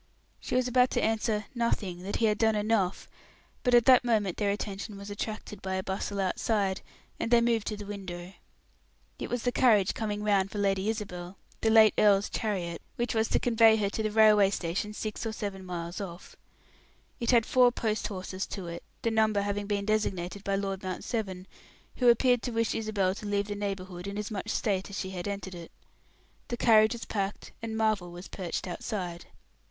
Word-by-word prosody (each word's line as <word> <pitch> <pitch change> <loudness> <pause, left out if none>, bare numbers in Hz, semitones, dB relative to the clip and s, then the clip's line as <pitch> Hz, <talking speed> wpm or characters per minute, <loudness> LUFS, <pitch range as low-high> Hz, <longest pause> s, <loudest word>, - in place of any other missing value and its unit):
She - - -4
was 255 0 +2
about 250 0 +4
to - - +2
answer 220 -1 0
"Nothing 210 -7 -1
that 195 +2 -4
he 230 - +2
had 210 -1 +2
done 220 -1 +3
enough," 205 -3 0 0.5
but 250 -2 +3
at 240 - +6
that 255 -2 +7
moment 215 -6 +1
their 205 -2 +1
attention 200 0 -4
was 200 +1 -8
attracted 210 -1 -5
by 190 0 -2
a 190 - -2
bustle 200 +1 -3
outside, 195 +1 0 0.4
and - - -1
they 240 0 +6
moved 235 -2 +1
to 210 - -2
the 205 - -7
window. 185 -3 -7 0.9
It - - -4
was 245 -1 -2
the 245 - +1
carriage 215 -7 +4
coming 210 -2 -3
round 200 -2 +2
for 210 - -7
Lady 195 0 +1
Isabel 190 -4 -5 0.2
the 220 - +2
late 220 -1 +7
earl's 200 -1 +4
chariot, 180 -6 -2
which 240 +1 -1
was 220 0 +2
to - - +1
convey 225 -2 +5
her 205 -2 0
to 220 - -2
the 215 - 0
railway 210 -2 +6
station 190 +2 -2
six 215 -1 -4
or 225 - -2
seven 200 -3 -5
miles 175 +1 -5
off. 175 -2 -8 0.8
It 235 - -2
had 235 -3 +5
four 250 -1 +5
post 220 -2 -1
horses 185 -1 -5
to 195 -3 -6
it, 170 0 -6 0.2
the 230 - +1
number 215 -2 +2
having 205 0 -2
been 200 -1 -1
designated 200 -3 -1
by 195 -1 0
Lord 195 -1 -2
Mount 185 -1 -4
Severn, 190 -5 -3 0.5
who 250 -2 +5
appeared 245 +1 +4
to 245 - -3
wish 230 0 0
Isabel 205 -4 0
to 210 +1 -7
leave 205 0 0
the - - -1
neighborhood 190 -3 -4
in 200 +1 -5
as 210 +2 -4
much 200 -3 -4
state 195 -3 -1
as 200 - -6
she 190 - -3
had 180 0 -5
entered 195 -2 -4
it. 170 -2 -9 0.8
The 240 - -3
carriage 220 -1 +5
was 235 - -6
packed, 200 -1 -3
and 225 -1 -4
Marvel 215 -5 +1
was 175 +2 -9
perched 180 -4 -4
outside. 180 -2 -5
205 Hz, 200 wpm, -29 LUFS, 190-220 Hz, 0.9 s, that